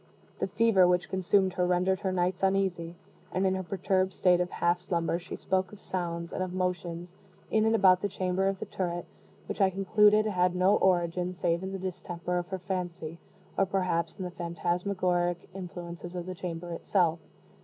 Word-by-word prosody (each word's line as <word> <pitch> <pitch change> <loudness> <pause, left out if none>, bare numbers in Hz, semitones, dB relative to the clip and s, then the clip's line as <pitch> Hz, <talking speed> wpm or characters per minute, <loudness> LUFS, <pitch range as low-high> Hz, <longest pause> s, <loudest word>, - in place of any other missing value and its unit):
The - - 0
fever 200 -2 +4
which 180 0 +1
consumed 190 0 +2
her 180 0 +1
rendered 180 +1 +2
her 190 -2 -1
nights 180 0 0
uneasy; 190 -3 0 0.4
and 190 +1 0
in 190 - +3
her 190 - -1
perturbed 190 +1 0
state 180 -1 +4
of 180 - -1
half 175 0 +1
slumber, 170 -2 -1
she 180 +1 -7
spoke 190 0 -1
of 210 - -12
sounds, 170 -2 -4
and - - -3
of 185 -1 -2
motions, 175 -1 -2 0.4
in 220 0 +3
and 225 0 +3
about 185 -3 +5
the 205 - -1
chamber 185 0 0
of 195 0 0
the - - -5
turret, 175 -2 -3 0.4
which - - -4
I 195 - +6
concluded 210 +3 +4
had 180 -3 +1
no 185 +3 +4
origin 180 -1 +1
save 170 -1 0
in 190 0 -4
the 195 - -3
distemper 180 -1 -3
of 175 - -5
her 190 - -3
fancy, 175 -3 -4 0.4
or 195 - +2
perhaps 185 -3 -1
in 190 - -4
the 180 - -5
phantasmagoric 175 +1 -1
influences 175 -1 -7
of 175 -1 -4
the 185 - -4
chamber 175 -1 -5
itself. 170 -1 +1
180 Hz, 185 wpm, -29 LUFS, 175-190 Hz, 0.4 s, I